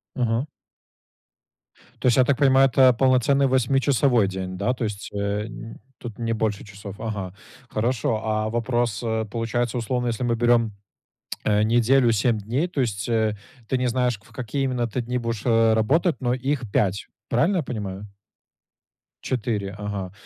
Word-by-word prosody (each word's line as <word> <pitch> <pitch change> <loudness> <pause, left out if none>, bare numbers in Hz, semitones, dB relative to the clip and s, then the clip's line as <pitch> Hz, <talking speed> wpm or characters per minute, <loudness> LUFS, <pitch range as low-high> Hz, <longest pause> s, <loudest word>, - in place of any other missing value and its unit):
Мгм. 120 +2 0 1.5
То - - +1
есть, 120 - +4
я 130 - +5
так 140 - +2
понимаю, 135 -1 +5
это 130 0 +5
полноценный 130 +2 +3
восьмичасовой 130 -3 +2
день, 95 -1 -5
да? 100 +6 0
То 120 - -3
есть, 105 -2 -6
э, 100 +1 -2
нь 115 +1 -9 0.2
тут 115 -3 -8
не 115 -1 -1
больше 110 -1 -2
часов. 100 -1 -9
Ага, 100 -5 -4 0.4
хорошо. 115 -1 0
А 110 0 -1
вопрос: 120 -1 -1
а, 110 0 0
получается, 115 +2 -2
условно, 125 +2 -1
если 115 +1 -2
мы 120 -1 +1
берем, 115 -2 +2 0.7
э, 105 0 +2
неделю, 120 +2 +4
7 115 +1 +2
дней. 120 - -1
То 150 -6 -2
есть, 110 -2 -2
э, 110 -2 +1 0.3
ты 130 - 0
не 125 - +1
знаешь, 125 -2 0
в - - -20
какие 130 +2 -3
именно 125 -3 0
ты 125 +3 -3
дни 125 +1 -2
будешь, 115 -3 -3
э, 115 -2 +4
работать, 150 - +2
но 120 -1 +1
их 130 -4 -2
5. 100 0 0 0.2
Правильно 165 +12 +2
я 165 - 0
понимаю? 105 -5 -5 1.2
4. 105 -5 -2
Ага. 100 -3 -4
115 Hz, 165 wpm, -24 LUFS, 105-125 Hz, 1.5 s, я